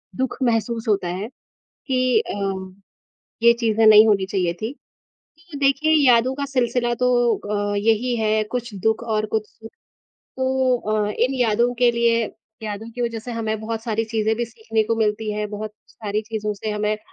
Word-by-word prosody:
दुःख 260 -1 -2
महसूस 230 -1 0
होता 195 -4 +1
है 185 +4 -4 0.6
कि 255 -2 +2 0.2
अम 190 -2 -4 0.7
ये 235 0 +7
चीज़ें 225 -2 +1
नहीं 215 0 +9
होनी 200 -3 +2
चाहिए 185 -3 0
थी। 220 +4 -2 0.8
तो 290 - -6
देखिए 280 +3 +2 0.2
यादों 245 +1 +4
का 280 0 -3
सिलसिला 245 -3 0
तो 250 +1 +1 0.6
अ, - - -1
यही 225 +4 +1
है, 215 -1 +1
कुछ 235 +1 -5
दुःख 220 +1 +1
और 215 -2 -1
कुछ 215 -1 0
सुख। 225 0 -14 0.7
तो 260 -1 +1
अ, 215 -2 -1
इन 255 +3 +2
यादों 240 -1 +2
के 245 0 +4
लिए 235 -1 +2 0.4
यादों 215 +1 -5
की 245 +2 -8
वज़ह 230 -1 -2
से 240 +2 -7
हमें 220 -2 -2
बहुत 225 0 -4
सारी 225 -1 -1
चीज़ें 220 0 0
भी 240 - -1
सीखने 225 -1 -2
को 230 - 0
मिलती 215 0 0
हैं, 210 0 -3
बहुत 210 0 -5 0.2
सारी 215 -1 -3
चीज़ों 215 -1 -3
से 215 +2 -5
हमें 210 0 0
अ, - - -9
225 Hz, 180 wpm, -22 LUFS, 215-240 Hz, 0.8 s, नहीं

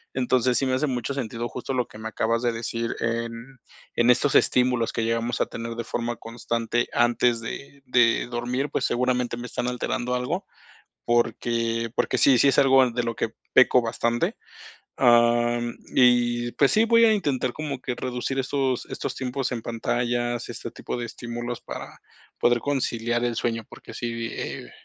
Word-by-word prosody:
Entonces, 125 -1 +2
sí 135 - +1
me 130 - 0
hace 140 +4 +1
mucho 125 +1 -2
sentido 120 -3 -3
justo 125 +2 -5
lo 125 -2 0
que 105 - -13
me 110 - -5
acabas 115 +1 0
de 120 -1 +1
decir, 115 0 -3
en 115 +3 -3 0.4
en 120 +1 +3
estos 135 +3 +4
estímulos 125 -2 +3
que 115 - -2
llegamos 115 +1 -1
a - - +3
tener 115 0 -6
de 115 - -3
forma 120 +1 -3
constante 115 +1 -2
antes 120 0 +3
de 140 +4 -8
de 120 -2 +3
dormir, 125 +3 -2
pues, 130 - 0
seguramente 125 -1 0
me 120 - -6
están 125 +1 -3
alterando 125 0 -2
algo 125 0 -2 0.6
porque 115 -1 0
porque 130 - +1
sí, 125 +2 +5
sí 140 - +5
es 135 - +3
algo 135 -2 +5
de 120 +1 -1
lo 115 -1 -2
que 115 - -1 0.2
peco 130 -1 +6
bastante, 115 +1 -1 0.6
am, 120 0 +3 0.2
y 120 -1 +3
pues 140 - +3
sí, 220 - +4
voy 230 0 +5
a 220 - +6
intentar 140 - 0
como 145 -3 -5
que 125 -3 -2
reducir 130 +1 -3
estos 130 -1 -1
estos - - -4
tiempos 130 0 -2
en 120 - -2
pantallas, 120 +1 -1
este - - -6
tipo - - -6
de 120 - -3
estímulos 120 +1 -6
para - - -8 0.4
poder 120 0 +3
conciliar 120 -3 -1
el 120 -1 0
sueño, 115 -1 -1
porque - - -12
sí, 115 -1 -3
eh, - - -6
120 Hz, 175 wpm, -25 LUFS, 115-125 Hz, 0.6 s, peco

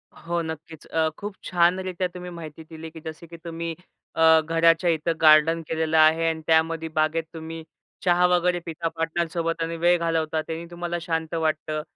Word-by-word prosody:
हो, 170 0 -3
नक्कीच 160 -1 -8
अ, 160 -1 +1
खूप 205 -1 -6
छानरित्या 180 +1 +1
तुम्ही 180 0 -7
माहिती 160 -2 -9
दिली, 160 0 -9
की 160 - -10
जसे 160 +1 -8
की 170 +1 -11
तुम्ही 165 -1 -5 0.4
अ, 160 0 +6
घराच्या 165 +2 +3
इथं 165 +1 +1
गार्डन 155 +1 +6
केलेलं 160 0 0
आहे 160 +1 +5
अन् 160 0 -3
त्यामध्ये 160 0 +2
बागेत 155 +1 +1
तुम्ही 160 0 -7 0.4
चहा 180 0 +4
वगैरे 180 0 +2
पिता 165 0 -3
पार्टनरसोबत 165 0 -2
आणि 165 0 -3
वेळ 175 +1 +4
घालवता 160 -1 0
त्यांनी 165 +1 -6
तुम्हाला 175 0 -3
शांत 165 -1 -3
वाटतं. 155 -1 -1
165 Hz, 165 wpm, -24 LUFS, 160-170 Hz, 0.4 s, अ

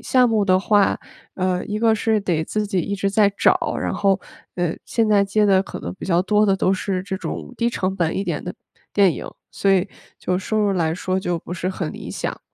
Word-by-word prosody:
项 255 -1 +4
目 220 -3 +2
的 185 -1 +4
话， 200 +1 +3 0.4
呃， 185 -1 0
一 210 +1 -3
个 225 -1 +4
是 220 0 +1
得 175 -6 0
自 210 +5 -2
己 190 -2 0
一 200 +4 -3
直 195 0 0
在 200 0 +4
找， - - +2
然 - - -2
后， 195 -2 +2 0.4
呃， 175 -2 -1
现 230 -2 +1
在 210 -2 +4
接 200 +2 +2
的 190 -2 +4
可 - - -8
能 90 - -5
比 - - -7
较 175 -1 +2
多 210 +2 +3
的 195 -1 +3
都 190 0 +2
是 190 -1 -2
这 190 0 -4
种 250 - -6
低 235 - +2
成 190 -5 -2
本 170 -4 0
一 195 - -1
点 - - -2
的， - - -6 0.4
电 195 -4 +5
影。 - - -7 0.2
所 195 - +1
以 190 -1 +3 0.3
就 180 0 -1
收 215 +3 -2
入 205 -1 +2
来 165 -4 0
说 185 +1 -1
就 175 -2 -1
不 165 - -9
是 180 0 -2
很 185 -4 -3
理 - - -8
想。 - - -4
195 Hz, 255 characters per minute, -21 LUFS, 185-210 Hz, 0.4 s, 电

